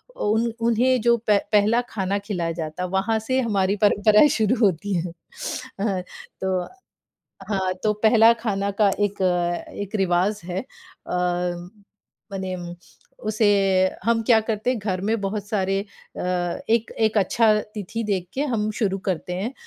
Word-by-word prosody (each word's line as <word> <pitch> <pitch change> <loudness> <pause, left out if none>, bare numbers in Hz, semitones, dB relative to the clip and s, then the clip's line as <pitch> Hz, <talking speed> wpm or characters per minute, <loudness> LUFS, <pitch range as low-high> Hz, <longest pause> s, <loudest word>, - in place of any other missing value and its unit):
उन 225 - +1
उन्हें 245 +2 +3
जो 235 +1 +4
पह 210 - +5
पहला 215 +2 +4
खाना 195 -1 -1
खिलाया 175 -6 -2
जाता 160 +3 -4
वहाँ 195 +4 0
से 255 +4 0
हमारी 200 -4 +1
परंपराएँ 210 +5 +5
शुरू 225 -4 +2
होती 200 -1 +1
हैं। 170 0 -2 0.7
हाँ 195 -4 0 0.4
तो 190 -1 0 0.9
हाँ। 190 -2 0
तो 215 -1 +2
पहला 225 +1 +7
खाना 200 -3 -1
का 205 - +6
एक 205 -1 -1 0.6
एक 205 +2 -5
रिवाज़ 190 +2 +1
है। 185 +1 -2
अ, 260 - -13 1.2
मने 190 -1 -3 0.7
उसे 215 -1 +2 0.6
हम 230 0 +2
क्या 230 -2 +6
करते 215 +3 -1
हैं, 250 - -2
घर 190 -3 -2
में 220 +2 0
बहुत 200 +1 -3
सारे 195 -2 0
अ, 200 0 -12 0.5
एक 230 0 +2
एक 220 -1 +2
अच्छा 215 +3 +3 0.2
तिथि 215 +3 -4
देख 180 -2 -1
के 275 - -2
हम 210 0 0
शुरू 195 -2 +1
करते 180 0 -2
हैं। 205 +8 -3
205 Hz, 145 wpm, -23 LUFS, 190-225 Hz, 1.2 s, पहला